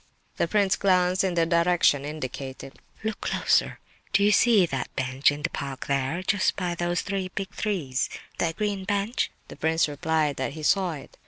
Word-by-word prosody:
The - - +1
prince 195 0 +2
glanced 185 -1 +3
in 185 -2 0
the 165 -1 +3
direction 170 -4 +3
indicated. 135 -2 -6 0.2
"Look 220 0 -3
closer. - - +1 0.4
Do 200 - +4
you 205 - +5
see 215 -3 +5
that 135 -6 -4
bench, 130 +2 +2
in 145 +1 -6
the 170 - -1
park 140 -2 -5
there, 140 +6 -1
just 190 0 +1
by 180 -2 -2
those 175 0 -1
three 195 -1 -3
big 195 0 -3
trees—that 165 - -2
green 205 -2 -1
bench?" 205 +4 -1 0.2
The - - -10
prince 160 +1 +2
replied 150 0 0
that 135 +1 -2
he 155 0 -8
saw 185 +1 +2
it. 145 - -11
170 Hz, 175 wpm, -26 LUFS, 145-195 Hz, 0.4 s, you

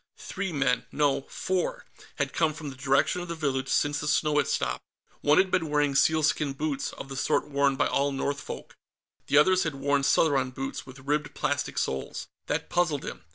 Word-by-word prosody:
Three 195 -2 -4
men 135 -5 0
no, 145 -2 +2
four 190 - -2 0.3
had - - -2
come 160 -2 +1
from 150 -3 -6
the - - -10
direction 135 +6 +1
of 175 - -6
the 170 - -4
village 135 -4 -1
since 145 0 +1
the 150 - -4
snow 150 0 +2
had 145 - +3
stopped. 65 -1 -1 0.4
One 150 +1 +4
had 190 0 +4
been 165 -4 +1
wearing 145 -1 +2
sealskin 150 0 +2
boots, 140 -1 -2
of - - -8
the 135 - -7
sort 140 - 0
worn 140 -1 +2
by - - +2
all 140 +1 +1
Northfolk. 140 +1 -4 0.6
The 145 - +3
others 185 +5 +5
had 160 -3 -1
worn 140 +1 +1
Southron 135 -2 +3
boots, 135 +1 -5
with 130 0 -11
ribbed 150 +1 -1
plastic 145 -1 -1
soles. 65 - -2 0.2
That - - -1
puzzled 160 -5 0
him. - - -7
145 Hz, 195 wpm, -27 LUFS, 135-155 Hz, 0.6 s, others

